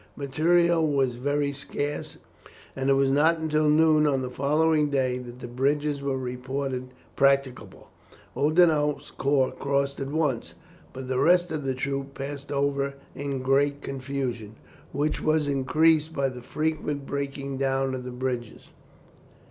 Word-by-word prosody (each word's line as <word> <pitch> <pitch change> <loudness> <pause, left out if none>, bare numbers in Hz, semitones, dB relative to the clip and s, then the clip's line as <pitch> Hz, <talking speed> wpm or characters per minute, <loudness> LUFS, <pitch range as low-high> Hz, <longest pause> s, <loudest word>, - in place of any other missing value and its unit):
Materials 160 +2 +2 0.2
were - - -11
very 145 +1 0
scarce, 145 +1 -4 0.6
and 135 0 -1
it - - +6
was 135 0 +3
not 155 +4 +4
until 155 -1 +1
noon 155 0 +4
on 135 -3 +1
the 125 - -4
following 150 +3 +2
day 130 -3 0
that 120 -1 -9
the - - -8
bridges 140 +4 0
were 140 -1 -1
reported 130 +1 -4 0.3
practicable. 135 -7 +1 0.5
Oudinot's 150 -2 +2
corps 135 -1 +1
crossed 140 0 -1
at 135 -1 -3
once, 150 -5 -1 0.4
but 130 0 -8
the 130 0 -1
rest 175 0 +4
of 155 -2 -3
the 135 -1 -1
troops 135 +1 -3
passed 140 +1 -6
over 140 -1 0 0.2
in 140 -2 -4
great 140 +2 +2
confusion, 130 -5 -4 0.4
which 145 +2 -1
was 155 -1 +1
increased 155 +4 +2
by 135 -1 +1
the 125 -1 -9
frequent 150 0 -2
breaking 140 -1 -4
down 135 0 0
of 130 -1 -4
the 125 - -6
bridges. 125 -2 -4
140 Hz, 145 wpm, -26 LUFS, 130-150 Hz, 0.6 s, it